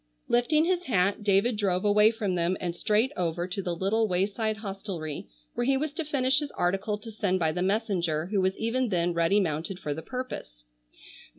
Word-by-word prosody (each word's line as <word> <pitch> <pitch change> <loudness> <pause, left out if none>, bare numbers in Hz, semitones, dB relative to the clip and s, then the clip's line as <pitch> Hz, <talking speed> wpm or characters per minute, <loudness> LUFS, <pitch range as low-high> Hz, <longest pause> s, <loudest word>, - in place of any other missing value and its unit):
Lifting 300 +7 +3
his 360 0 0
hat 200 -2 +1
David 205 +3 +3
drove 190 -2 0
away 210 +1 +6
from 220 -4 -2
them 175 +1 0
and 175 -2 -3
straight 215 +8 +1
over 175 0 -1
to 195 +2 -3
the 175 -2 -2
little 215 +5 +1
wayside 205 +4 0
hostelry 195 -7 -5 0.3
where 240 - -1
he 270 0 +3
was 295 +1 -2
to 330 - -3
finish 270 -2 +1
his 295 -2 -4
article 195 +4 0
to 225 +2 -10
send 200 -3 0
by 160 -3 +1
the 180 +3 -3
messenger 185 -6 0
who 195 +1 0
was 190 +1 +1
even 235 +2 0
then 175 -2 +1
ready 170 +4 +3
mounted 165 0 -2
for 150 -6 -3
the 160 - -6
purpose. 250 - -6
200 Hz, 195 wpm, -28 LUFS, 180-225 Hz, 0.3 s, away